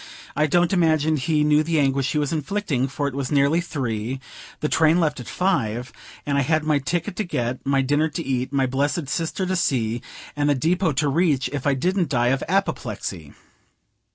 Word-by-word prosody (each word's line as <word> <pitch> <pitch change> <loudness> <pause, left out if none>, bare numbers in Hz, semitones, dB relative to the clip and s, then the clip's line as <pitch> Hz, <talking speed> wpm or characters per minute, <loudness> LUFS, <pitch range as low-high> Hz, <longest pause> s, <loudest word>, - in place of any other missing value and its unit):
I 150 - +2
don't 175 +4 +2
imagine 160 -3 +2
he 150 +2 +1
knew 150 0 +4
the 160 0 0
anguish 135 -1 +1
he - - 0
was 145 0 0
inflicting; 155 -4 -1
for 140 +1 -2
it 140 - -4
was 135 -2 -3
nearly 145 +4 +3
three, 130 -6 -3 0.4
the 150 - 0
train 160 +2 +3
left 150 -5 0
at 125 - -8
five, 125 - -1 0.3
and 140 -1 +1
I - - +3
had 155 +3 +1
my 155 -2 +2
ticket 175 +6 -2
to 215 - 0
get, 125 - -3
my 135 -1 +3
dinner 145 +4 +2
to 165 +1 -5
eat, 130 -1 -1
my 135 -2 +2
blessed 140 +3 -1
sister 165 +4 -2
to 185 +1 -1
see, 120 -9 0 0.3
and 145 0 +1
the 145 - +3
depot 165 +4 +1
to 150 +2 +1
reach, 145 -4 +1
if 145 -1 -2
I 140 - +3
didn't 180 +4 0
die 120 -3 +2
of 135 +1 +1
apoplexy. 105 - -2
145 Hz, 200 wpm, -23 LUFS, 130-165 Hz, 0.4 s, knew